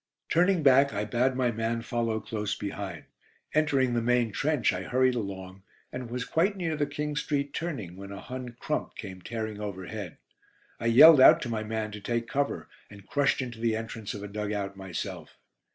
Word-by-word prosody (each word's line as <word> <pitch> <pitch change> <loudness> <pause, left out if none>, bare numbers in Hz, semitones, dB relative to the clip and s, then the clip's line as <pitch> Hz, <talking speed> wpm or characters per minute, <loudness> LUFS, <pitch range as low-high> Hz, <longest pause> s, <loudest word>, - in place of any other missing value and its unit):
Turning 180 0 +3
back, 140 0 +6
I 105 +1 -1
bade 125 +4 +1
my 125 -2 +1
man 115 +1 -2
follow 115 -2 -1
close 105 -4 -3
behind. 100 -5 -5 0.5
Entering 140 -5 +2
the 120 - +1
main 120 -1 +2
trench, 145 +2 +1
I - - -3
hurried 130 0 +2
along, 95 -4 -5 0.3
and 125 -2 -6
was 125 +1 -3
quite 190 +9 +1
near 165 -4 -1
the 145 -1 0
King 150 0 -3
Street 145 -1 -1
turning 135 - -4
when 100 0 -9
a 100 - -7
Hun 125 -2 -7
"crump" 150 - -3
came 95 -3 -8
tearing 110 0 -5
overhead. 100 -2 -6 0.6
I 115 - -1
yelled 135 +5 +9
out - - +9
to 120 - -4
my 110 -2 -1
man 110 0 -3
to 105 0 -8
take 115 +2 -2
cover, 140 +2 -1 0.2
and 100 -1 -13
crushed 140 0 +1
into 120 -3 -7
the 115 -1 +1
entrance 110 -2 -5
of 100 - -7
a - - -5
dug 105 +1 -4
out 100 -1 -3
myself. 95 -3 -6
115 Hz, 190 wpm, -28 LUFS, 105-135 Hz, 0.6 s, yelled